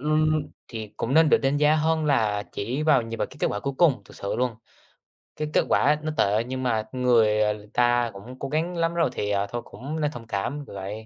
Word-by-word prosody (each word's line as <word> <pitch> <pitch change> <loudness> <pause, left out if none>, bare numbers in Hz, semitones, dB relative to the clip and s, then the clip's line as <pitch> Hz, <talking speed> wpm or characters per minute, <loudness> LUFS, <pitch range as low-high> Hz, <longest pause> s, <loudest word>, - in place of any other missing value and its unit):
ưm, 155 0 +1 0.2
thì 110 -3 -7
cũng 125 +5 -2
nên 160 0 +6
được - - +5
đánh 135 +1 +1
giá 150 +1 +4
hơn 160 0 +1
là 110 -8 +1
chỉ 125 +8 -3
vào 145 -6 +4
nhìn 115 0 -6
vào - - 0
cái - - -15
kết - - +2
quả 105 - -3
cuối 140 -1 -3
cùng, 150 -7 +4
thực - - -14
sự 100 - -3
luôn. 125 -2 0 0.8
Cái 155 0 -3
kết - - +3
quả - - +4
á 150 +3 +3
nó 155 - -2
tệ 105 +3 +2
nhưng 130 +1 -4
mà 110 -3 0
người, 115 -4 +3
ờ, 105 0 -1
ta 120 -1 +2
cũng 120 +7 -11
cố 135 - -4
gắng 170 +3 -1
lắm 165 0 +1
rồi, 170 -4 +2
thì, 105 - -2
ờ, 100 0 0
thôi 120 +2 -4
cũng 150 +5 -6
nên 150 -1 +1
thông 115 -5 -10
cảm, 120 +8 -3
kiểu - - -11
vậy. 100 +3 -6
125 Hz, 250 wpm, -25 LUFS, 110-150 Hz, 0.8 s, nên